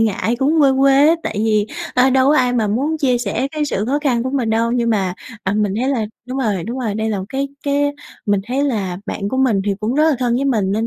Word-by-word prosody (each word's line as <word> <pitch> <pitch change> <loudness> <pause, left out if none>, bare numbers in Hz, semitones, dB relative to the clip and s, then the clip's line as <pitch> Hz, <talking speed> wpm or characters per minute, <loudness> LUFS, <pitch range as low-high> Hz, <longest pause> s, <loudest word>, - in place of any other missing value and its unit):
ngại, 225 +2 0
cũng 300 +4 +2
quê 275 - +5
quê 275 +2 +5
á 325 - +5
tại - - -4
vì, 215 -1 +1 0.3
ơ, 255 +1 +4
đâu 260 0 +3
có 300 - +4
ai 250 -1 +2
mà 230 -3 +1
muốn 285 +9 -1
chia 255 -4 +2
sẻ 240 +4 -2
cái 305 -1 -1
sự 210 -8 -2
khó 285 +3 +1
khăn 245 -5 +1
của 260 - -3
mình 255 -5 -1
đâu. 230 +1 +1
Nhưng 235 -1 +1
mà, 190 -4 0 0.3
à, 195 - 0
mình 205 -2 0
thấy 260 - 0
là 250 -6 0 0.2
đúng 255 +1 -4
rồi, 205 -9 -1
đúng 240 +4 -5
rồi, 225 -5 -2
đây 220 +1 -1
là 205 - -1
một 190 - -4
cái 275 +2 -2
cái 285 0 +1 0.3
mình 205 -1 +2
thấy 265 +3 -1
là 195 -9 -2
bạn 200 - -3
của 260 - -3
mình 245 -7 +2
thì 200 -1 0
cũng 220 +4 -1
rất 305 +2 +3
là - - +2
thân 245 -2 0
với 275 - -1
mình 215 -8 +1
nên 220 +2 0
245 Hz, 280 wpm, -18 LUFS, 215-270 Hz, 0.3 s, quê